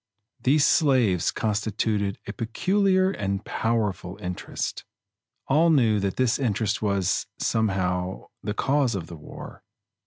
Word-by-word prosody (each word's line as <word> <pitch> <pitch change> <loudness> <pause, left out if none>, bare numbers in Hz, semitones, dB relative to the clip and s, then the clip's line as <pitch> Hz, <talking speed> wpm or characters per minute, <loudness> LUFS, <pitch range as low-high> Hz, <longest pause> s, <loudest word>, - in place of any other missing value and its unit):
These 145 +3 +4
slaves 125 - +3
constituted 105 -1 -1
a 100 - -5
peculiar 185 - +1
and 100 - -3
powerful 105 -5 -1
interest. 90 -2 -4 0.6
All 155 +5 +4
knew 115 -9 +4
that 100 -1 -1
this 130 0 +1
interest 110 -5 0
was, 100 -3 0
somehow, 95 -4 -1
the 105 0 -3
cause 135 -3 +1
of 90 -4 -4
the 85 - -9
war. 75 - -10
110 Hz, 120 wpm, -25 LUFS, 95-130 Hz, 0.6 s, These